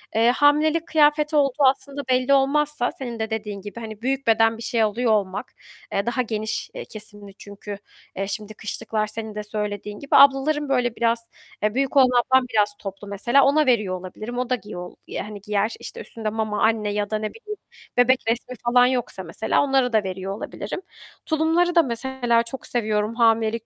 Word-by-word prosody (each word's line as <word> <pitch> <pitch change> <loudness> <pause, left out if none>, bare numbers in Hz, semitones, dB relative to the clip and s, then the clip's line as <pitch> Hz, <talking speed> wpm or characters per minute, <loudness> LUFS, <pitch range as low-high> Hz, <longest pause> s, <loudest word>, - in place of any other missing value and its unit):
Eee, 230 +2 +4
hamilelik 310 +3 +3
kıyafeti 300 0 +3
olduğu 280 0 +2
aslında 275 +2 +1
belli 255 +2 +3
olmazsa 280 -1 +2
senin 240 -3 -5
de 220 0 -2
dediğin 210 -2 -4
gibi, 205 +3 -8
hani, 220 -1 -8
büyük 270 0 -2
beden 225 0 +4
bir 230 - -8
şey 235 -3 0
alıyor 225 +2 +1
olmak, 200 -2 -1 0.4
eee, 200 +2 0
daha 240 +1 0
geniş, 220 -2 -3
eee, - - -7
kesimli 205 -2 -11
çünkü, 205 0 -8 0.4
eee, 195 +1 -2
şimdi 215 +1 -5
kışlıklar 215 0 -3
senin 220 0 -6
de 210 - -4
söylediğin 210 -1 -4
gibi. 280 - -11
Ablaların 280 +1 +5
böyle 245 -3 +1
biraz, 230 0 0 0.3
eee, 210 0 +2
büyük 275 +1 0
olan 260 -2 +7 0.2
ablam 260 -1 +4
biraz 210 -2 +1
toplu 195 +1 -8
mesela. 235 +7 +3
Ona 300 +2 +4
veriyor 210 -7 +2
olabilirim. 215 +6 -7
O 250 0 -2
da 255 - +3
giyol 180 -6 -9
yani 210 -1 -6
giyer. 210 +1 0
İşte, - - -8
üstünde 220 -2 -5
mama, 215 -1 -2
anne 220 -2 +2
ya 205 0 -2
da 215 - 0
ne 215 0 -3
bileyim 425 -2 -8 0.4
bebek 255 +1 +5
resmi 240 +2 -2
falan 245 +1 +5
yoksa 245 -7 -2
mesela 180 +6 0
onlara 265 -3 +2
da 215 -2 +3
veriyor 190 +1 -4
olabilirim. 240 - -6 0.4
Tulumları 330 +2 +2
da 335 - +6
mesela 240 -1 0
çok 245 +3 -8
seviyorum 215 -1 -1
hamilelik 225 -1 +2
230 Hz, 185 wpm, -23 LUFS, 210-265 Hz, 0.4 s, olan